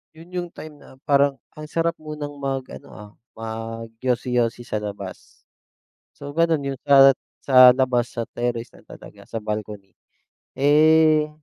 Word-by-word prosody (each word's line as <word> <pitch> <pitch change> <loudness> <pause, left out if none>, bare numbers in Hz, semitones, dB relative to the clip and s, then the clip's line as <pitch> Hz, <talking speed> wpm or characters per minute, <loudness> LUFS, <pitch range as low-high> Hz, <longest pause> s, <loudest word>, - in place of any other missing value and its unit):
'Yon 165 +3 -15
yung 180 -1 -4
time 150 -2 -11
na - - -17
parang 140 -1 +3 0.2
ang 150 - -7
sarap 165 +1 0
munang 150 -2 -7
mag 135 -1 -3
ano, - - -11
ah, 105 -1 -12 0.2
mag 115 0 -7
yosi-yosi 125 -1 -1
sa 110 -3 -3
labas. 100 -2 -9 0.7
So, 145 +1 -10
gano'n 165 -2 +2
'yon 135 - -3
at 135 -2 +7 0.2
sa 130 -2 +7
labas, 125 -1 0
sa 115 -1 -5
terrace 120 -1 -2
na - - -18
talaga, - - -14
sa 115 - -6
balcony, 105 -2 -6 0.6
eh, 155 +2 +4
130 Hz, 145 wpm, -22 LUFS, 115-150 Hz, 0.7 s, at